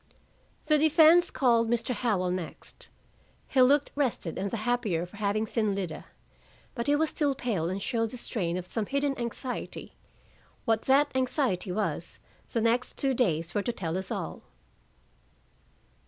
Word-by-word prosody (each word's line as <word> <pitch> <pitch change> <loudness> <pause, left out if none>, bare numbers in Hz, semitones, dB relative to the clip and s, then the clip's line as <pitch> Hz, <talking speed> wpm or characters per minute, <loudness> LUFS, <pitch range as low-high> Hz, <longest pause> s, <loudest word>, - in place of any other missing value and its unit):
The 305 -1 +4
defense 320 +3 +6
called 235 -3 +2
Mr. 240 +1 0
Howell 205 -6 0
next. 180 -3 -5 0.6
He 260 - +3
looked 280 +3 +4
rested, 255 - -1
and 200 +1 -1
the 230 - -3
happier 220 -9 0
for 180 +3 -14
having 210 +1 0
seen 215 -2 0
Lida, 185 -5 -4 0.7
but 235 - -3
he 290 - +4
was 315 +1 +1
still 285 -3 0
pale 210 -11 -1
and 190 +2 -2
showed 225 +1 -1
the 250 - -8
strain 180 -8 -2
of 180 - -5
some 210 +2 -3
hidden 280 0 0
anxiety. 245 +2 -5 0.7
What 225 -1 +1
that 285 +2 +4
anxiety 255 - 0
was, 210 +4 -2 0.3
the 230 - 0
next 235 +2 +1
two 270 -1 +1
days 170 -9 0
were 205 - +1
to 240 - -1
tell 170 -7 -4
us 190 0 -3
all. - - -4
230 Hz, 155 wpm, -28 LUFS, 195-265 Hz, 0.7 s, defense